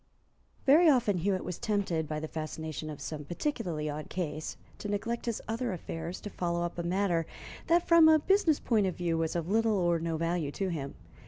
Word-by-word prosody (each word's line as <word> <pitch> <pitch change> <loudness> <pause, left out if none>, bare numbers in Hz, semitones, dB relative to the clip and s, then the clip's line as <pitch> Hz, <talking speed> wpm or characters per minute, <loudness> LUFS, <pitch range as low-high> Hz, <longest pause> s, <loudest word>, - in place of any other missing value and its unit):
Very 315 +5 +7
often 225 -9 +3
Hewitt 190 +1 0
was 180 - -5
tempted, 190 -7 0
by 155 0 -3
the 155 - -4
fascination 155 0 -5
of 150 - -7
some 150 -2 -5
particularly 175 - -2
odd 150 +1 -5
case, 155 -4 -4 0.2
to 210 - -5
neglect 230 +4 -2
his 230 - -2
other 230 0 -2
affairs 165 0 -5
to 210 - -6
follow 170 -1 -1
up 175 0 -4
a - - +1
matter 175 -2 0 0.4
that 340 +1 +3
from 335 -2 +7
a 315 - +7
business 335 -1 +3
point 215 -5 +2
of 185 - -2
view 170 -2 0
was 165 0 -1
of 170 -1 -1
little 220 +1 +2
or 175 -2 +2
no 165 0 -2
value 165 -2 -1
to 195 -1 -1
him. 140 -5 -4
175 Hz, 200 wpm, -30 LUFS, 160-225 Hz, 0.4 s, Very